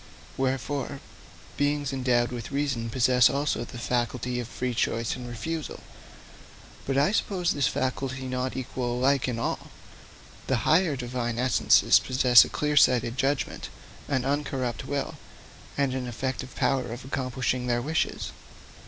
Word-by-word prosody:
Wherefore, 135 +1 -2 0.6
beings 145 -1 0
endowed 125 -2 +1
with 120 -2 -5
reason 135 -5 -1
possess 125 0 +4
also 140 +2 -1
the 120 - -9
faculty 125 0 -1
of 120 - -4
free 125 0 -3
choice 115 0 0
and 125 -1 -7
refusal. 155 +7 -5 1.1
But 135 0 0
I 145 +6 +4
suppose 190 -4 0
this 140 -4 +1
faculty 130 0 -2
not 130 0 -2
equal 125 -1 -3
alike 135 +2 +2
in 125 -2 -2
all. 115 - -3 0.8
The 120 -5 0
higher 160 -1 +4
Divine 120 -2 -3
essences 125 -1 +5
possess 125 -2 +6
a - - -6
clear 150 0 -1
sighted 120 -3 +4
judgment, 135 -1 -1 0.4
an 130 -2 0
uncorrupt 135 -4 -2
will, 140 -1 -3 0.6
and 140 -2 +1
an 130 -1 -3
effective 130 +2 -4
power 130 -3 +1
of 120 +2 -7
accomplishing 130 -1 -2
their 120 -1 +1
wishes. 160 +3 -1
130 Hz, 140 wpm, -27 LUFS, 120-140 Hz, 1.1 s, possess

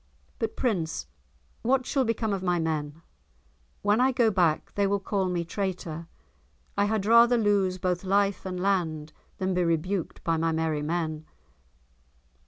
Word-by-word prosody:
"But 225 -1 -2
Prince, 165 - -1 0.6
what 260 +1 +2
shall 270 0 +1
become 225 -2 0
of 195 - -2
my 180 -1 +1
men? 160 -1 -3 0.8
When 205 +3 +3
I 260 +1 +4
go 235 -3 +3
back 175 -6 +1
they 200 -1 +1
will 200 +1 +1
call 195 -1 -1
me 175 -1 -1
traitor. 170 -4 -4 0.7
I 200 - +2
had 210 -1 0
rather 235 +2 +6
lose 200 -4 +2
both 180 0 -1
life 200 +1 +1
and 185 -1 -4
land 165 -6 -1 0.2
than 190 -2 -1
be 180 0 +1
rebuked 170 +2 -1
by 165 -1 +1
my 165 +1 +1
merry 160 -2 0
men." 155 0 -2
185 Hz, 155 wpm, -27 LUFS, 165-205 Hz, 0.8 s, rather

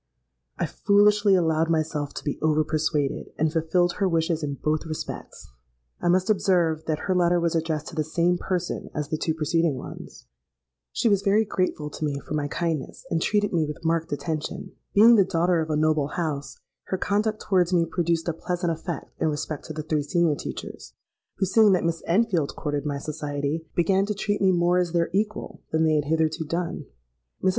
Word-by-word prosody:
I - - 0
foolishly 205 0 +4
allowed 165 -2 +2
myself 155 -3 -1
to - - -6
be 145 - -3
over 155 0 +3
persuaded, 155 -2 -1
and 155 0 +1
fulfilled 170 +2 +1
her 195 -2 +2
wishes 165 -1 0
in 145 -2 -3
both 155 +3 -1
respects. 155 - -7 0.5
I - - 0
must 185 +2 +3
observe 175 -6 +2
that 155 -2 -1
her 190 - +1
letter 175 -1 +3
was 170 -1 0
addressed 160 -2 -1
to - - -11
the 155 - +1
same 170 +3 +1
person 180 -2 -3
as 150 -1 -3
the 155 - -1
two 160 - -1
preceding 160 -1 +1
ones. - - -10 0.7
"She - - 0
was 200 -3 +3
very 205 +2 +3
grateful 180 -7 -2
to - - -6
me 145 -2 -1
for 145 - -8
my 150 -1 0
kindness, 160 -2 -3
and 165 - +1
treated 205 +1 +1
me 165 -2 +2
with 150 +2 -7
marked 165 0 0
attention. 150 +2 -4 0.2
Being 225 +3 +8
the 200 - +6
daughter 175 -2 +1
of 160 - -4
a 155 - +1
noble 155 -1 +2
house, 150 -4 -3 0.3
her 190 - -2
conduct 210 +3 0
towards 180 -2 +1
me 170 -2 +3
produced 170 0 -1
a 170 - +1
pleasant 175 +1 -2
effect 165 -1 -5
in - - +3
respect 150 -1 -3
to 155 - -6
the 155 0 -5
three 155 -1 0
senior 170 +1 +2
teachers, 145 - -7 0.4
who, 195 - 0
seeing 210 +2 +5
that 180 - +1
Miss 165 0 -1
Enfield 175 -5 +1
courted 145 -1 -3
my 145 -1 -2
society, 150 +1 -3
began 190 +3 +2
to 210 - -2
treat 205 0 -1
me 190 -1 +5
more 175 0 +3
as 175 -2 -1
their 170 -1 +1
equal 210 +2 -2
than 160 0 +2
they 160 -1 +3
had 150 -1 +1
hitherto 160 +1 0
done. 165 -2 -3 0.6
Mrs. 190 - +4
165 Hz, 200 wpm, -25 LUFS, 155-180 Hz, 0.7 s, Being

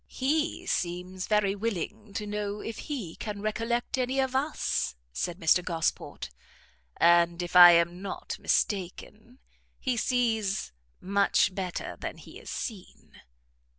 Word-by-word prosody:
"He 315 +6 -1
seems 180 - -2
very 210 -2 +2
willing 210 0 -4
to 210 - -3
know 210 0 -3
if 225 - -6
he 230 - -4
can 210 -2 -5
recollect 230 +5 -1
any 255 +1 0
of 265 -1 0
us," 270 - 0 0.2
said 175 - -3
Mr 175 +1 +4
Gosport, 165 - -2 0.7
"and, 170 0 +4
if 175 - -7
I 175 -1 +11
am 170 +2 +2
not 195 - -5
mistaken, 210 +5 -2 0.4
he 255 -2 -1
sees 225 - 0 0.3
much 200 0 +2
better 185 -2 -4
than - - -5
he - - -12
is - - -11
seen." 210 -7 -7
205 Hz, 130 wpm, -28 LUFS, 180-235 Hz, 0.7 s, I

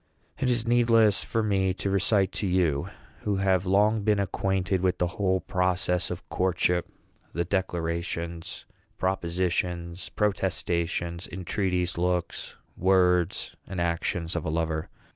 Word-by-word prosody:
It 130 - +1
is 120 -2 +2
needless 115 -3 +4
for 115 - -1
me 95 -3 +1
to 100 0 -2
recite 100 0 +2
to 100 - -2
you, 85 -6 +1 0.3
who 105 -1 -1
have 95 -1 +1
long 105 +3 +3
been 105 0 +2
acquainted 95 -1 0
with 90 -1 +1
the 90 - +1 0.2
whole 95 -1 +2
process 90 -1 0
of - - -6
courtship, 90 -1 +1 0.5
the 85 +2 -1
declarations, 85 -2 -3 0.3
propositions, 90 -1 -1
protestations, 85 -4 -1
entreaties, 90 -1 -1
looks, 90 -1 -1 0.2
words, 90 -1 +2
and 95 - -5
actions 85 0 -1
of 85 - -1
a - - -2
lover. 80 0 -1
90 Hz, 125 wpm, -27 LUFS, 85-95 Hz, 0.5 s, needless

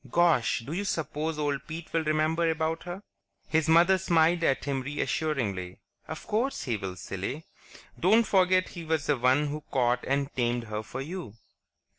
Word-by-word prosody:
Gosh, 165 -8 +3
do 150 - -5
you 195 +4 -1
suppose 160 -4 -2
old 145 -2 -2
Pete 160 0 -7
will 165 -1 +1
remember 155 +2 +1
about 160 0 -1
her?" 180 +3 -6 0.4
His 160 0 +1
mother 175 +4 +6
smiled 170 -1 +3
at 135 -4 +1
him 135 -2 -1
reassuringly. 125 - -2 0.3
"Of - - -7
course 240 +6 -1
he 120 - -1
will, 95 -3 -5
silly. 100 - -5 0.5
Don't 215 +6 +5
forget 185 -3 +3
he 170 - -8
was 160 -2 -1
the 150 - +2
one 130 +4 +3
who 150 +1 -4
caught 125 -2 +1
and 140 +1 -1
tamed 120 -1 0
her 105 -1 -4
for 125 +4 -6
you." 155 - -6
155 Hz, 170 wpm, -28 LUFS, 130-170 Hz, 0.5 s, mother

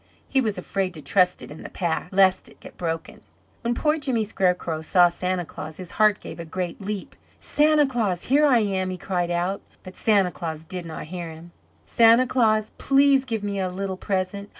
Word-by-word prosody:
He 270 - +2
was 215 -4 -1
afraid 190 -2 -2
to 155 - -9
trust 180 -2 +2
it - - -10
in 150 - -10
the - - -8
pack, 170 -2 -2
lest 190 -1 +3
it - - -20
get - - -13
broken. 165 -2 -4 0.4
When 235 0 -1
poor 305 +3 +1
Jimmy 260 -6 0
Scarecrow 180 -6 -1
saw 175 +2 +4
Santa 180 0 -2
Claus 155 0 -8
his 180 -2 -8
heart 215 -2 +3
gave - - -9
a - - -4
great 175 +3 -5
leap. 200 -1 -5 0.2
"Santa 300 0 +3
Claus! 220 -9 -1
Here 290 +4 +4
I 245 -5 +4
am!" 190 -3 -1
he 185 - -4
cried 180 -2 -2
out, 175 +3 -1 0.2
but 185 0 -11
Santa 200 -5 +2
Claus 160 -2 -6
did 180 +1 -6
not 160 - -6
hear 175 -2 -5
him. 160 +2 -12 0.3
"Santa 230 +2 +5
Claus, 220 -4 +2
please 275 -1 +4
give 225 -4 -3
me 200 -1 -2
a 185 -1 -1
little 190 +1 -4
present. 195 +1 -3
190 Hz, 200 wpm, -24 LUFS, 175-225 Hz, 0.4 s, Santa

